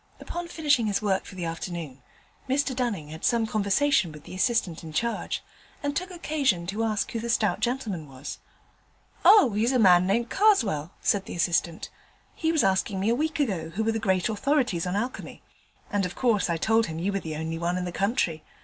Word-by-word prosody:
Upon 345 0 -5
finishing 295 -9 +1
his 205 +1 -1
work 195 -2 +1
for - - -11
the 180 -2 -4
afternoon, 165 -5 -5 0.5
Mr 270 0 +1
Dunning 215 - -2
had 160 +1 -9
some 235 -2 +2
conversation 215 - +2
with 150 -1 -12
the - - -11
assistant 185 -4 0
in 160 - -8
charge, 235 +8 -2 0.4
and 285 0 -1
took 365 +1 -2
occasion 290 - 0
to 205 +5 -2
ask 215 -2 -1
who 230 - -3
the 235 +1 -4
stout 220 -4 +1
gentleman 220 - -2
was. 135 +1 -8 0.8
'Oh, 405 - +7
he's 220 +4 +2
a 260 - +2
man 185 -5 +6
named 230 +5 0
Karswell,' 230 - +3
said 200 -2 +1
the - - -7
assistant; 170 -1 0 0.4
'he 320 -1 0
was 320 -3 +2
asking 190 +1 +1
me 200 +3 +1
a 235 - +3
week 310 +2 -1
ago 190 - -1
who 195 +7 -2
were 225 - +1
the 225 - -2
great 190 -4 +1
authorities 225 - 0
on 180 - -2
alchemy, 245 +5 -4 0.5
and 205 -1 +1
of 180 -1 -3
course 220 -8 +1
I 170 - +1
told 225 +5 +2
him 160 - -5
you 190 +4 -1
were 195 - 0
the 160 -4 -6
only 160 +1 -4
one 175 +1 -1
in 180 - -2
the 175 - -4
country. 195 - 0
205 Hz, 205 wpm, -26 LUFS, 175-245 Hz, 0.8 s, Oh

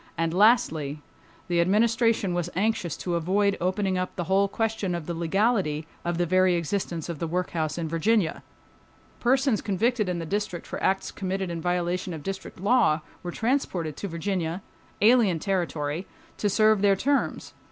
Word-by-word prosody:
And 165 0 0
lastly, 175 - +3 0.5
the 175 -1 +2
Administration 220 +1 +2
was 175 -1 -1
anxious 195 -4 0
to 175 - -3
avoid 195 +4 +2
opening 185 +1 0
up 185 - -3
the 175 - -2
whole 195 +3 +2
question 215 -3 -1
of 170 -3 -5
the 170 - -3
legality 170 -2 +1 0.2
of 175 0 -1
the 175 - +1
very 185 +1 +3
existence 170 -1 -2
of 170 -4 -5
the 165 - -2
workhouse 165 -2 -2
in 165 -2 -2
Virginia. 170 +3 +1 0.8
Persons 260 -1 +2
convicted 215 +1 0
in 180 - -1
the 165 - -4
District 200 -1 -3
for - - -6
acts 190 0 0
committed 190 -1 -3
in 165 -1 -4
violation 175 0 -1
of 150 - -9
District 190 0 -6
law 200 -6 +3 0.2
were 175 - -5
transported 190 - -1
to 200 - -4
Virginia—alien 190 +4 0
territory—to 170 +2 -3
serve 215 0 +4
their 200 -1 +5
terms. 280 +8 -1
185 Hz, 155 wpm, -26 LUFS, 170-205 Hz, 0.8 s, their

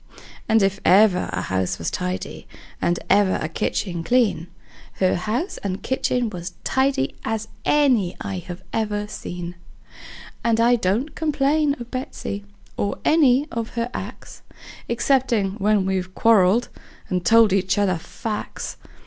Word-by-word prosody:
And 220 -1 +5
if 195 0 +1
ever 190 -1 +5
a 90 0 -2
house 95 -1 -1
was 80 - -3
tidy, 90 +1 -4 0.3
and 175 - +1
ever 200 -2 +4
a - - -2
kitchen 170 +1 -2
clean, 225 -7 +2 0.5
Her 185 -1 +2
house 225 - -2
and 195 -1 -4
kitchen 250 -3 0
was 175 -1 -6
tidy 265 - +1
as 220 -1 -2 0.2
any 250 -11 +3
I 185 -3 -4 0.3
ever 210 -2 -1
seen; 175 -4 -6 0.9
And 230 -1 +2
I 240 +1 +5
don't 230 +7 0
complain 295 -1 +1
of 240 0 -9
Betsey, 255 -5 -5 0.3
or 200 - -1
any 290 -3 +4
of 230 -1 -4
her 235 +1 -2
acts, - - -8 0.5
Exceptin' 235 -4 +2
when 205 -1 +2
we've 185 -1 -2
quarreled, 225 0 +4 0.4
and 180 -2 -1
told 225 -2 +5
each 190 0 +1
other 195 -4 +2
facts. 210 +5 -5
210 Hz, 135 wpm, -22 LUFS, 185-245 Hz, 0.9 s, And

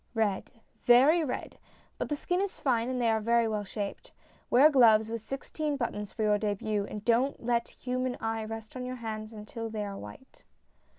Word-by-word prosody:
" - - -40
Red, 200 -2 -3 0.3
very 275 +8 +6
red! 260 -4 -5 0.4
But - - -2
the 295 - 0
skin 355 +5 -1
is 400 -1 -3
fine, 240 -3 +1
and 255 -1 -2
they 235 -2 +3
are 220 0 +1
very 235 +1 +3
well 210 -1 -1
shaped. 200 0 -6 0.4
Wear 265 +5 +7
gloves 225 -5 +5
with 230 -1 -3
sixteen 285 +4 -3
buttons 210 -5 -3
for 220 - -3
your 210 -1 +3
dehut, 205 0 -1
and 210 0 -7
don't 240 +2 +1
let 235 -1 +1
human 255 0 -3
eye 225 0 -2
rest 220 +1 -7
on 255 - -4
your 255 0 -4
hands 220 -2 -5
until 225 +1 -6
they 215 -1 -3
are 200 -1 -5
white." 105 - -12
230 Hz, 195 wpm, -29 LUFS, 215-255 Hz, 0.4 s, Wear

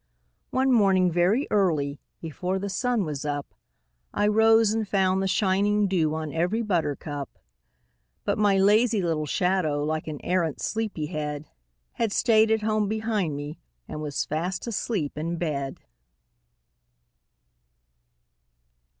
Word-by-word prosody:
MY 260 - +1
SHADOW - - +3
[Pg 265 - +3
21] - - +5
One 230 - +5
morning, 190 -2 +3
very 185 - +2
early, 155 -8 +1 0.2
before 180 +4 -3
the 200 +1 -4
sun 240 0 0
was 150 -2 -4
up, 145 -1 -4 0.6
I 205 - 0
rose 220 0 +4
and 220 -1 -1
found 190 -1 +1
the 195 - 0
shining 205 +2 +2
dew 160 -5 +1
on 155 -2 -4
every 180 +8 0
buttercup; 145 - -3 0.9
But - - -1
my 205 -2 +4
lazy 210 +2 +3
little 155 -3 -1
shadow, 170 -4 0
like 155 +1 -2
an 150 -2 -5
arrant 175 -4 0
sleepy 215 -8 -2
head, 150 -2 -5 0.4
Had 230 -3 -1
stayed 220 0 +4
at 220 -1 +1
home 215 -1 +1
behind 215 -7 -1
me 145 +2 -7 0.3
and 150 - -6
was 145 -2 -2
fast 175 +4 -3
asleep 195 -10 -2
in 165 +2 -3
bed. 140 -5 -3
185 Hz, 140 wpm, -26 LUFS, 155-210 Hz, 0.9 s, 21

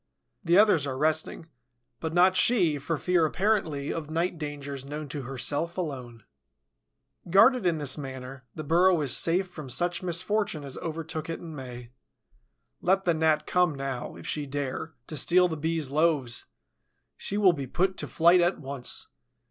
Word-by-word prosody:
The 170 0 +3
others 200 -9 +4
are 130 -1 -4
resting, 155 +2 0 0.5
but 160 - -3
not 180 +2 +4
she, 180 -9 +3
for 150 +3 -2
fear, 180 +1 +2
apparently, 160 -4 0
of 155 -2 -5
night 165 +1 -1
dangers 145 -3 -6
known 150 +2 -6
to 145 +1 -5
herself 145 +7 -2
alone. 130 - -5 1.1
Guarded 220 +3 +5
in 170 -2 +1
this 145 -1 0
manner, 130 -1 -8
the 155 - -5
burrow 175 +3 +4
is 135 -3 +2
safe 180 +3 +2
from 155 -6 -9
such 175 +8 0
a - - -7
misfortune 180 -1 0
as 135 -2 -5
overtook 160 -1 -5
it 165 - -4
in 165 -2 -9
May. 125 -3 -9 0.9
Let 190 +2 +2
the 170 - +3
Gnat 160 -1 +1
come 180 -4 +2
now, 135 -2 -5
if - - -11
she 150 -2 -3
dare, 145 +3 -4
to 155 - -7
steal 180 +5 +4
the 165 - -4
Bee's 160 -2 -2
loaves! 150 -5 +1 0.7
She 205 - -2
will 195 -4 +5
be 140 -4 -5
put 185 +7 0
to - - -3
flight 175 +2 +4
at 175 +2 +2
once. 135 -3 -3
160 Hz, 170 wpm, -27 LUFS, 140-175 Hz, 1.1 s, Guarded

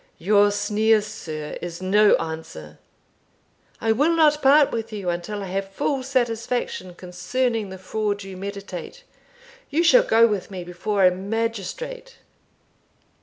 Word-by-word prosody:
"Your 205 +3 +4
sneer, 215 +2 +2
sir, 160 -8 -7
is 170 -1 -6
no 205 +3 +4
answer; 160 - -7 1.0
I 225 - +1
will 295 +9 +2
not 300 -2 +4
part 280 +1 +5
with 225 0 -4
you 200 -4 -2
until 185 +4 -4
I - - -5
have 195 +1 -3
full 265 +7 -1
satisfaction 240 -7 -2
concerning 210 +5 -2
the 190 - -8
fraud 205 +2 -3
you 195 -1 -9
meditate 200 - -7 0.7
you 315 +4 +1
shall - - +7
go 230 - +4
with 210 -5 -1
me 185 -3 -6
before 185 +3 0
a 180 - +6
magistrate." 230 - -4
210 Hz, 135 wpm, -23 LUFS, 185-240 Hz, 1.0 s, shall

